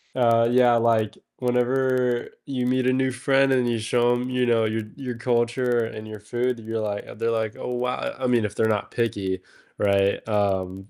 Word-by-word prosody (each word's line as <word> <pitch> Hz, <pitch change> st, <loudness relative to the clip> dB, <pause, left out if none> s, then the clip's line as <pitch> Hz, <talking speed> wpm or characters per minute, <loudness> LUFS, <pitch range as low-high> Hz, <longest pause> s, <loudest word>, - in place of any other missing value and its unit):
Uh, 115 Hz, -2 st, +4 dB
yeah, 125 Hz, -1 st, +5 dB
like, 115 Hz, -2 st, +1 dB, 0.2 s
whenever 125 Hz, 0 st, +1 dB, 0.2 s
you 130 Hz, -3 st, -2 dB
meet 130 Hz, 0 st, +1 dB
a 130 Hz, -, +3 dB
new 130 Hz, 0 st, +1 dB
friend 135 Hz, +1 st, +2 dB
and 125 Hz, -2 st, +2 dB
you 115 Hz, -1 st, 0 dB
show 120 Hz, +2 st, +2 dB
them, 125 Hz, +1 st, -3 dB
you 125 Hz, -1 st, +1 dB
know, 115 Hz, -2 st, +3 dB
your 110 Hz, 0 st, -1 dB
your 130 Hz, -3 st, -5 dB
culture 120 Hz, 0 st, +1 dB
and 110 Hz, -1 st, -8 dB
your 110 Hz, -1 st, -8 dB
food, 120 Hz, +3 st, -2 dB
you're 115 Hz, 0 st, -4 dB
like 105 Hz, -1 st, -3 dB
they're 115 Hz, 0 st, 0 dB
like, 110 Hz, -1 st, -1 dB
"Oh, 125 Hz, -, -4 dB
wow," 125 Hz, +1 st, -1 dB
I 130 Hz, -, -5 dB
I -, -, +2 dB
mean, 120 Hz, -3 st, +2 dB
if 105 Hz, -, -5 dB
they're 110 Hz, -, +2 dB
not 105 Hz, -2 st, -1 dB
picky, 95 Hz, -5 st, -2 dB, 0.4 s
right? 100 Hz, -1 st, +1 dB
Um 95 Hz, -2 st, -1 dB
120 Hz, 200 wpm, -24 LUFS, 110-125 Hz, 0.4 s, yeah